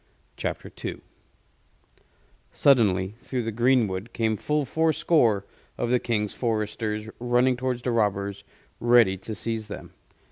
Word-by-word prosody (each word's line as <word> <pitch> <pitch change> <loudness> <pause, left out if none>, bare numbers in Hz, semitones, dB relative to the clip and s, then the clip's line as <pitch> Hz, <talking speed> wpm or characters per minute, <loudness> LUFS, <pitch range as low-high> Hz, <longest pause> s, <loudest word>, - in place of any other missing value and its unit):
CHAPTER - - -4
II - - -4 1.5
Suddenly 100 -8 +3
through 125 0 -3
the 115 - -2
greenwood 115 -3 +1
came 110 -1 +1
full 150 +7 -1
four 160 +4 +1
score 115 - +2 0.3
of 120 - -1
the 125 - +4
King's 105 -4 -1
Foresters, 110 -2 -2
running 125 +1 +2
towards 125 -1 -2
the 125 - 0
robbers, 100 -3 0 0.4
ready 120 -5 +5
to 105 +4 -7
seize 110 +2 -3
them. 105 - -9
115 Hz, 130 wpm, -26 LUFS, 105-125 Hz, 1.5 s, ready